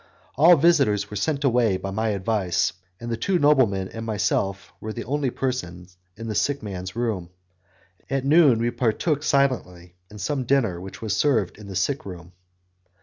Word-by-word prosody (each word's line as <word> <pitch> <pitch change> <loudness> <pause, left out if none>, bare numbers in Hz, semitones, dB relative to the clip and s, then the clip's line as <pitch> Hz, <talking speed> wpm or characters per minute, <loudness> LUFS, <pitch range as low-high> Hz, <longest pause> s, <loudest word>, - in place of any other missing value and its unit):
All 165 +6 +7
visitors 135 - +2
were - - -6
sent 145 +7 -1
away 120 -7 +2
by 95 +1 -5
my 110 +3 -1
advice, 100 -3 0 0.3
and 120 0 -6
the 115 - -1
two 190 - +1
noblemen 130 - +3
and 115 - -7
myself 95 -3 -1
were 110 - -5
the 115 +2 -5
only 140 +1 -1
persons 90 -9 -4 0.2
in 115 - -7
the 110 - -3
sick 140 +6 0
man's 95 -2 -6
room. 110 -8 -2 0.8
At 135 -1 -1
noon 145 -4 +5
we 120 +1 0
partook 130 +6 0
silently 110 - 0 0.2
of 105 - -11
some 130 +7 -2
dinner 115 -10 +1
which 95 +4 -9
was 110 - -1
served 115 -10 +1
in 105 - -11
the 95 - -7
sick 135 +9 -1
room. 90 -3 -10
115 Hz, 175 wpm, -24 LUFS, 95-135 Hz, 0.8 s, All